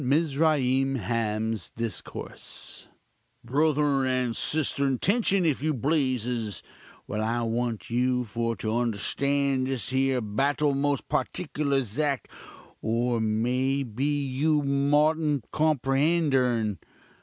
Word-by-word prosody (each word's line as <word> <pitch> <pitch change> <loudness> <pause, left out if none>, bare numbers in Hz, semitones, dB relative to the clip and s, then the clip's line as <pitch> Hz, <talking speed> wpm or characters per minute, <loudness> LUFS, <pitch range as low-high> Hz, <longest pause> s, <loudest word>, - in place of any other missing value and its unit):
MIZRAIM 135 -2 +2
HAM'S 110 -1 -1
DISCOURSE 115 -3 -5 0.6
"Bruthurn 145 0 +2
and 125 -2 0
sisturn, 140 -3 +1
tention, 200 -3 +2
if 150 -5 +1
you 155 0 0
pleases, 125 - -1 0.4
while 105 +1 -3
I 115 +2 0
want 115 0 -2
you 125 +1 +1
for 115 +1 -2
to 110 +1 -2
understand 130 +4 0
this 130 -4 -2
here 130 0 +1
battul 140 +7 +1
most 140 0 0
partiklur 145 -3 -1
'zact, 135 +5 -1 0.6
or 115 +1 0
may 125 +5 +1
be 140 +5 -1
you 145 +3 +1
moughtn't 145 0 +2
comprend 155 +1 +2
urn. 115 -6 +1
135 Hz, 105 wpm, -27 LUFS, 115-145 Hz, 0.6 s, MIZRAIM